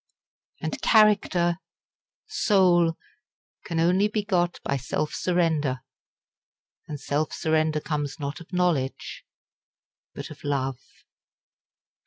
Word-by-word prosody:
_" - - -2
And - - -3
character 185 -5 +4 0.7
soul 180 - +3 0.7
can 165 -1 -2
only 180 +5 +3
be 210 0 -2
got 175 -4 0
by 140 - -1
self 140 +3 -2
surrender; 160 -7 0 1.1
and 150 -2 -6
self 145 +3 -1
surrender 155 -1 +1
comes 145 -1 -3
not 140 0 -4
of 170 - -14
knowledge 175 -8 -1 0.9
but - - -7
of - - -12
love. 135 -3 -2
165 Hz, 105 wpm, -26 LUFS, 145-180 Hz, 1.1 s, character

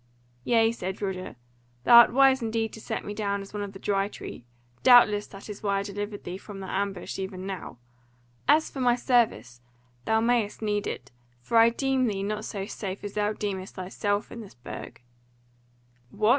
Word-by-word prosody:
"Yea," 225 - +3
said 190 -4 -5
Roger, 190 -4 -4 0.5
"thou 235 - +8
art 235 - +9
wise 270 0 +5
indeed 225 -1 -1
to 220 - -9
set - - -4
me 205 - -4
down 200 -1 -1
as 195 +1 -10
one 210 - -3
of 200 -1 -4
the 195 - -10
Dry 195 0 0
Tree; 125 - -9 0.3
doubtless 215 -5 +6
that 195 0 -11
is 210 -2 -8
why 200 -1 +1
I 195 - -1
delivered 205 +1 -5
thee 180 +2 -6
from 205 -1 -10
their 190 -1 -6
ambush 195 -1 -3
even 190 -1 -5
now. 190 -9 -6 0.7
And 295 +3 +7
as 315 - -5
for 275 - -7
my 245 -2 +4
service, 235 - +1 0.4
thou 220 - +3
mayst 230 -2 +1
need 210 -1 -1
it; - - -6 0.3
for 225 - +3
indeed 230 +1 +4
I - - -27
deem 270 -2 +2
thee 195 -3 -2
not 210 +1 -3
so 195 -2 -4
safe 195 -2 -6
as 205 -1 -5
thou 210 0 0
deemest 195 -3 -4
thyself 205 +3 -2
in 235 - -7
this 205 - -12
Burg." 120 0 -9 1.1
"What!" 210 - +1
205 Hz, 200 wpm, -27 LUFS, 195-225 Hz, 1.1 s, art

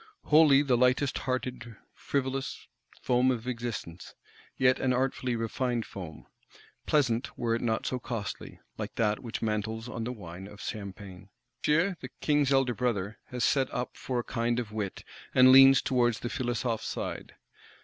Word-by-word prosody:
Wholly 150 -2 +6
the 130 -4 +2
lightest 125 +3 +2
hearted 125 -2 -3 0.2
frivolous 135 -1 -3 0.4
foam 125 +1 +3
of 125 -1 -2
Existence; 115 -8 -5 0.4
yet 130 0 +3
an 130 -1 +1
artfully 130 -1 0
refined 115 +1 -1
foam; 85 -6 -9 0.6
pleasant 125 -5 +1
were 115 -1 0
it 115 - -1
not 110 -2 -1
so 130 - -1
costly, 110 -5 -6 0.2
like - - -5
that 105 -2 +1
which 115 -2 -5
mantles 110 +1 -2
on 115 -2 -5
the 120 - -3
wine 95 -4 -9
of 105 -1 -13
Champagne! 100 -3 -7 0.3
Monsieur, 175 +5 +2
the - - -7
King's 145 -2 +2
elder 135 -2 +3
Brother, 115 -4 -2
has 125 -1 -4
set 135 -2 +2
up 125 0 -4
for 130 - -4
a - - -14
kind 120 +1 -1
of 115 -3 -5
wit; 105 -3 -4 0.3
and 130 0 +8
leans 135 +1 +8
towards 120 -3 +1
the 120 - -3
Philosophe 120 -4 -2
side. - - -5
120 Hz, 160 wpm, -29 LUFS, 110-130 Hz, 0.6 s, and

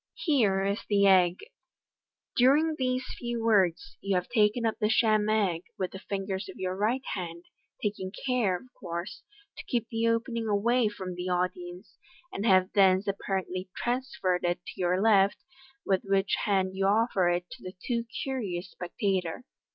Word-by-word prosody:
Here 210 - +2
is 200 +2 -1
the 200 -1 +4
egg. 185 -2 +5 1.0
During 290 +6 +4
these 255 -2 -1
few 240 -2 -3
words, 195 -7 +2
you 195 -1 0
have 180 0 0
taken 230 0 +2
up 220 - -1
the 210 -2 +1
sham 215 -2 +3
egg 195 -6 +1
with 185 -1 -2
the 190 - -8
fingers 195 -1 -4
of - - -10
your 185 0 -2
right 225 +7 0
hand, 170 -2 -6 0.4
taking 200 -3 -2
care, 245 -8 +2
of 255 +7 -18
course, 170 +1 -6 0.4
to - - -6
keep 235 -3 -1
the 225 0 0
opening 230 0 0
away 225 +3 +2
from 190 -3 -5
the 180 +1 -4
audience, 180 +1 -3 0.3
and 205 +4 -2
have 185 -2 +4
thence 190 -1 +4
apparently 190 -1 -3
trans 260 +2 -2
ferred 180 -1 +1
it 175 0 -1
to - - -7
your 180 +1 +2
left, 200 -2 +4 0.5
with 190 -2 +2
which 195 0 +1
hand 190 -2 +1
you 195 0 +1
offer 205 -3 +2
it 175 0 -1
to - - -10
the 185 +1 -8
too 235 -2 0 0.2
curious 200 -9 -4
spectator. 185 +1 -2
195 Hz, 165 wpm, -28 LUFS, 185-230 Hz, 1.0 s, egg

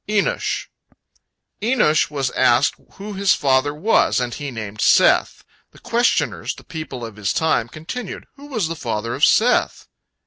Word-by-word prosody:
ENOSH 210 -1 -1 0.9
Enosh 215 -10 +2
was 140 -3 -2
asked 120 +4 +3 0.2
who 205 +1 -8
his 195 0 +2
father 135 +1 +2
was, 155 +3 +2
and 125 -1 -3
he 145 -1 -5
named 110 -4 -7
Seth. - - +3 0.3
The - - -17
questioners, 240 +1 0
the - - -14
people 155 -8 -7
of 110 -2 -10
his 100 -3 -1
time, 155 -8 +1
continued: 180 - -7
"Who 285 +1 -13
was 220 - -2
the 165 - -4
father 115 -5 -3
of 145 - -5
Seth?" 245 +7 +3
150 Hz, 150 wpm, -20 LUFS, 120-205 Hz, 0.9 s, asked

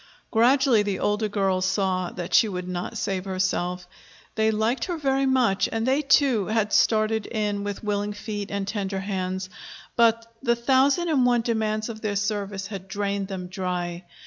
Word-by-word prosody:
Gradually 245 0 +4
the 200 -2 -1
older 210 +2 0
girls 195 -2 0
saw 185 -2 0
that 175 -1 -6
she 225 - +6
would 180 -2 -5
not 180 -1 -4
save 190 -1 -2
herself. 185 -1 -1 0.5
They 220 0 +2
liked 220 +4 0
her 350 -2 -3
very 270 -2 +1
much, 250 -7 +2
and 225 0 -1
they, 265 +3 +2
too, 275 -7 +3
had 215 -1 0
started 220 -1 +2
in 210 -2 -2
with 205 +1 -5
willing 205 0 -1
feet 205 -1 -5
and 200 -1 -3
tender 195 -2 -2
hands; 190 -1 -3 0.5
but 230 -1 +3 0.2
the 235 -3 +2
thousand 270 +7 +2
and 280 -5 +3
one 245 -1 +3
demands 220 -2 -1
of 220 -2 -7
their 210 -2 -2
service 200 -1 -2
had 195 -2 -7
drained 200 0 -2
them 190 -2 -5
dry. 180 -1 -4
205 Hz, 170 wpm, -25 LUFS, 190-230 Hz, 0.5 s, she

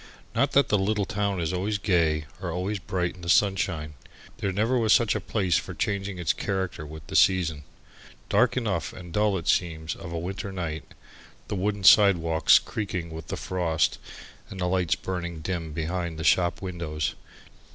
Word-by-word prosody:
Not - - +1
that 140 - +4
the 105 - +3
little 100 +1 0
town 100 -3 -1
is 85 +1 -1
always 100 +3 -1
gay 85 -6 +1 0.2
or 90 -2 -3
always 95 +4 -2
bright 90 -1 -2
in 90 - -15
the 85 - -5
sunshine. 90 -6 +2 0.5
There 100 - -1
never 110 +7 +1
was 110 -2 +4
such 115 -6 +4
a - - -1
place 95 - +1
for - - -5
changing 100 -2 -2
its 85 -4 +1
character 95 -5 -3
with 80 0 -10
the - - -7
season. 80 -6 +3 0.6
Dark - - +3
enough 95 - -1
and 85 -2 -10
dull 105 -1 +2
it 85 - -7
seems 80 -2 0
of 90 -3 -9
a 85 - -3
winter 95 +4 -4
night, 80 -6 -5 0.5
the - - -2
wooden 100 +1 -1
sidewalks 85 -6 +6
creaking 95 -6 -4
with 80 -1 -8
the - - -4
frost, 85 -4 0 0.5
and 95 - -8
the 90 - 0
lights 90 -2 +1
burning 85 -3 -5
dim 85 -1 -3
behind 85 +1 -3
the 80 - -4
shop 85 +2 +2
windows. 80 -6 -3
90 Hz, 180 wpm, -26 LUFS, 80-100 Hz, 0.6 s, sidewalks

